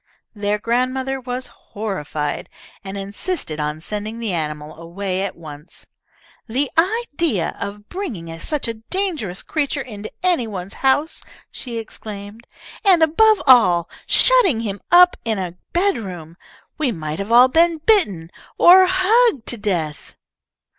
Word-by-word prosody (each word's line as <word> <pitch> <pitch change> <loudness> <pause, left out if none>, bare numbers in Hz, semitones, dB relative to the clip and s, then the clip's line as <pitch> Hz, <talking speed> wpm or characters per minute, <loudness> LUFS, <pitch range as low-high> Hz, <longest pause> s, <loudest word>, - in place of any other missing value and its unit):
Their 205 -1 -1
grandmother 255 +4 -1
was 250 +1 -4
horrified, 190 -11 -5 0.3
and 195 0 -6
insisted 200 - -4
on 150 +1 -2
sending 210 +4 -5
the 225 -5 -3
animal 150 -2 -4
away 185 +3 -4
at 195 -1 -3
once. 150 -1 -12 0.6
"The 260 +4 -1
idea 335 - 0
of 205 +1 -6
bringing 200 - -6
such 295 - -2
a 230 - -2
dangerous 230 - -4
creature 290 -2 -2
into 215 -3 -8
any 345 -10 +2
one's 195 -2 -6
house," 285 +4 +1 0.3
she 240 -3 -6
exclaimed, 215 0 -8 0.4
"and, 365 -5 +5
above 430 +7 +4
all, 215 -10 +6
of 170 - -18 0.2
shutting 400 - +4
him 205 -3 -4
up 360 +1 +7
in 225 -2 -1
a 180 -2 -4 0.2
bedroom! 195 - -2 0.4
We 285 -5 +1
might 155 -4 -5
have 200 +3 -4
all 245 +2 +8
been 330 +4 +3
bitten, 295 - +1 0.3
or 370 +1 +8
hugged 380 - +3
to 240 - -2
death!" 175 -8 -3
225 Hz, 135 wpm, -20 LUFS, 190-315 Hz, 0.6 s, all